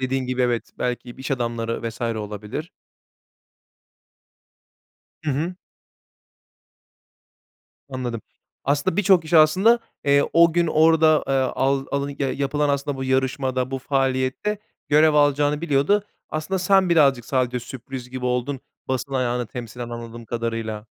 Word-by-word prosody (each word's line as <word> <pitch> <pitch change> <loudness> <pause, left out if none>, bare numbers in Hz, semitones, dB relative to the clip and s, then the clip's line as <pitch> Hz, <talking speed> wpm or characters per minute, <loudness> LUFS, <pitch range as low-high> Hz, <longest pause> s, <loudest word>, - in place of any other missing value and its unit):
dediğin 130 0 -1
gibi, 125 0 0
evet, 120 -2 -1
belki 125 0 -3
b - - -12
iş 135 - -6
adamları 115 -2 -2
vs. 115 - -11
olabilir. 110 - -4 2.5
Hı 150 - 0
hı. 160 +7 -2 2.4
Anladım. 125 -4 -4 0.4
Aslında 145 +5 0
birçok 190 -3 +4
kişi, 165 +1 +1
aslında, 190 +10 +5 0.3
eee, 140 0 +4
o 170 0 +6
gün 170 0 +2
orada, 160 0 +4
eee, - - +1
al 135 +1 +1
alın 140 0 -2
ya 135 -2 0
yapılan 145 +1 0
aslında 140 0 -1
bu 130 - -4
yarışmada, 130 0 0
bu 135 - -2
faaliyette 135 +9 -1 0.3
görev 155 +1 +5
alacağını 145 0 +3
biliyordu. 170 +6 +2 0.2
Aslında 155 +5 -2
sen 190 0 +3
birazcık 140 -7 +4
sadece 125 -2 0
sürpriz 125 0 -8
gibi 130 0 -5
oldun, 125 +2 -1 0.3
basın 130 +1 -2
ayağını 125 -2 0
temsilen, 120 0 -7
anladığım 115 0 -8
kadarıyla. 115 -2 -4
135 Hz, 130 wpm, -23 LUFS, 125-150 Hz, 2.5 s, o